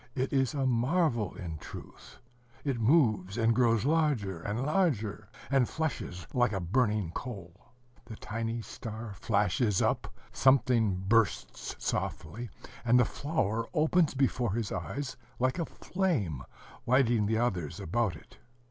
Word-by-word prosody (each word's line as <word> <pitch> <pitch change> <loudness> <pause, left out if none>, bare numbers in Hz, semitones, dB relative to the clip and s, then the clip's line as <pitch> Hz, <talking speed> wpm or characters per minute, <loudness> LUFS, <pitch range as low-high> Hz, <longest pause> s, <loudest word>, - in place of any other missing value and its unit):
It 130 +1 -1
is 135 +1 +2
a 135 -2 0
marvel, 125 - +1
in 80 -4 -6
truth. - - -11 0.5
It 135 -5 -1
moves, 110 - +3
and 115 0 +3
grows 115 -2 +3
larger 140 - +1
and 110 +8 -2
larger, 115 - 0 0.2
and 135 -3 +3
flushes 120 - -3
like 120 -3 +2
a 95 - 0
burning 105 -1 +1
coal. 100 -7 -8 0.4
The 115 -1 -8
tiny 115 +2 -4
star 110 +1 -7
flashes 105 +1 +1
up, - - 0 0.2
something 125 -6 +3
bursts 115 -1 +1
softly, 110 +10 -3 0.3
and 120 +1 +5
the 125 - +5
flower 115 -7 -1
opens 160 0 +3
before 125 -5 +1
his 115 -2 -2
eyes 140 -2 -4 0.2
like 130 +6 +1
a 165 - -1
flame, 135 - -1 0.5
lighting 120 -4 +3
the 110 +1 +1
others 95 -11 -1
about 110 +1 0
it. - - -16
115 Hz, 135 wpm, -30 LUFS, 105-135 Hz, 0.5 s, and